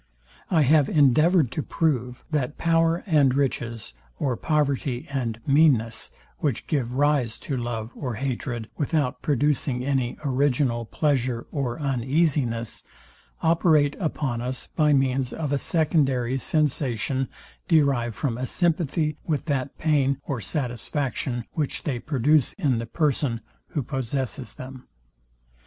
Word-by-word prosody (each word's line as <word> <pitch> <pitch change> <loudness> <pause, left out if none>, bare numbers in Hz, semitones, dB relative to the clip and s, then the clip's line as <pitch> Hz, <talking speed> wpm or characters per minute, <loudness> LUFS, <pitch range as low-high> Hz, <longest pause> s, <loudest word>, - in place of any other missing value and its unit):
I 165 -5 +4
have 145 0 +4
endeavoured 155 +1 +4
to 155 - -2
prove, 125 -6 -1
that 145 -2 -1
power 165 0 +2
and 145 -8 +3
riches, 120 - -2 0.2
or 130 -3 0
poverty 140 -3 0
and 120 -5 -2
meanness; 135 -6 +3 0.3
which 140 -7 -1
give 125 -5 -1
rise 140 -5 +2
to 140 - -2
love 120 -2 -3
or 125 -5 -4
hatred, 120 -2 -3
without 145 -3 0
producing 140 -2 +1
any 135 -3 0
original 130 -3 +1
pleasure 125 -3 0
or 135 -1 -2
uneasiness; 135 -3 0 0.6
operate 160 -3 +3
upon 140 - -2
us 125 +1 -4
by 150 -2 +1
means 135 -2 +1
of 150 -3 -3
a 140 - +1
secondary 135 -7 +1
sensation 135 -3 0 0.4
derived 140 - +2
from 125 -5 -2
a 130 - -2
sympathy 160 -2 0
with 155 -4 -1
that 140 -3 -2
pain 140 -4 +2
or 130 -5 -3
satisfaction, 125 - -2
which 150 -4 -2
they 130 -5 -2
produce 145 +1 +2
in 140 - 0
the 115 - -4
person, 140 -5 0 0.3
who 145 - -2
possesses 130 -1 -3
them. 130 0 -10
135 Hz, 125 wpm, -25 LUFS, 125-150 Hz, 0.6 s, I